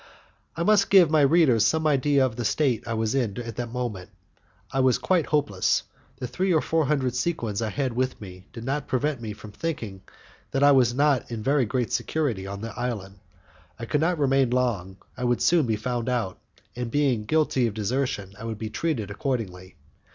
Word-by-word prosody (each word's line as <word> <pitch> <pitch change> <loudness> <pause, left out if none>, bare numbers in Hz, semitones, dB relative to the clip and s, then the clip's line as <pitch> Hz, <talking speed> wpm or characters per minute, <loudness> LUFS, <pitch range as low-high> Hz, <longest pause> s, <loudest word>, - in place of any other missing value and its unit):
I 170 - 0
must 205 +1 +4
give 180 -5 +6
my 155 -1 +4
readers 140 -6 +4
some 160 +8 +2
idea 140 -2 +3
of 120 -4 -3
the 120 - -3
state 120 0 0
I 115 - -2
was 110 0 0
in 120 -6 -1
at 115 -2 -6
that 120 -1 -3
moment. 115 -7 -4 0.6
I 135 - -1
was 130 -1 +4
quietly 160 +7 +1
hopeless. 120 -11 +1 0.3
The - - -5
three 180 +11 -1
or 160 - +4
four 160 0 +1
hundred 130 -4 +1
sequins 120 -7 -2
I 110 - -1
had 130 +1 -2
with 130 +2 -1
me 95 -1 -11
did 115 -2 -8
not 135 +3 -2
prevent 135 0 -1
me 110 -2 -5
from 105 0 -11
thinking 110 - -5 0.5
that 135 - 0
I 145 - +7
was 125 -3 +4
not 140 -2 +2
in 115 -3 -5
very 140 0 +2
great 125 0 -1
security 120 -12 -1
on 100 +1 -6
the 115 0 -5
island; 105 -6 -4 0.6
I 115 - -6
could 150 +5 0
not 175 +2 +1
remain 135 -3 +2
long, 115 -7 -1 0.2
I 125 - -5
would 120 -1 +1
soon 165 -6 +3
be 110 - +1
found 120 +2 -2
out, 115 -7 -2 0.4
and, 120 -1 -3
being 130 -5 +1
guilty 140 -3 +2
of 105 - -5
desertion, 110 -2 -2
I 115 - -6
should 110 -2 -4
be 110 0 -5
treated 125 -12 -2
accordingly. 95 -7 -4
125 Hz, 205 wpm, -25 LUFS, 110-145 Hz, 0.6 s, I